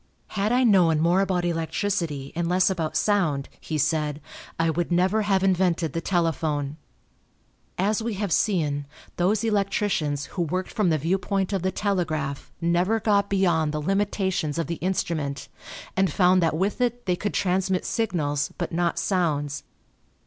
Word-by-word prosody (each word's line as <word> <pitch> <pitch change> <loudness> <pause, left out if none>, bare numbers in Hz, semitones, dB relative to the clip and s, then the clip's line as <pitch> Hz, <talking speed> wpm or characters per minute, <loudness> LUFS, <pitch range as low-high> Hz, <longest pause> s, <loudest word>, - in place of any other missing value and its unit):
"Had 210 +1 -1
I 250 +1 +3
known 180 -9 +4
more 175 +4 +3
about 185 -2 0
electricity 165 -3 -2
and 170 0 -1
less 185 +2 +3
about 165 -4 -2
sound," 170 -10 +1
he 155 - -4
said, 150 0 0 0.4
"I 165 0 +2
would 170 +2 -2
never 185 +5 +2
have 195 -2 +1
invented 180 -5 +1
the 165 - -2
telephone." 155 -5 -1 1.0
As 205 +4 +1
we 225 -1 -2
have 200 -2 -2
seen, 150 -7 +1 0.3
those 200 +5 +2
electricians 195 -9 0
who 180 - -2
worked 180 +3 -2
from 210 -6 +1
the 160 - +2
viewpoint 190 +5 -1
of 195 - 0
the 190 +1 0
telegraph 155 -8 -2
never 175 +6 +1
got 200 -2 +2
beyond 170 -6 +2
the 150 - -1
limitations 190 -3 0
of 165 - 0
the 170 0 -4
instrument 165 -6 -2 0.5
and 190 -1 +2
found 185 -1 +4
that 165 -2 +1
with 200 +7 -1
it 245 0 0
they 180 -2 +1
could 205 +3 -3
transmit 190 0 0
signals 160 - -1
but 175 - -3
not 170 0 0
sounds. 145 -7 0
180 Hz, 155 wpm, -25 LUFS, 160-195 Hz, 1.0 s, known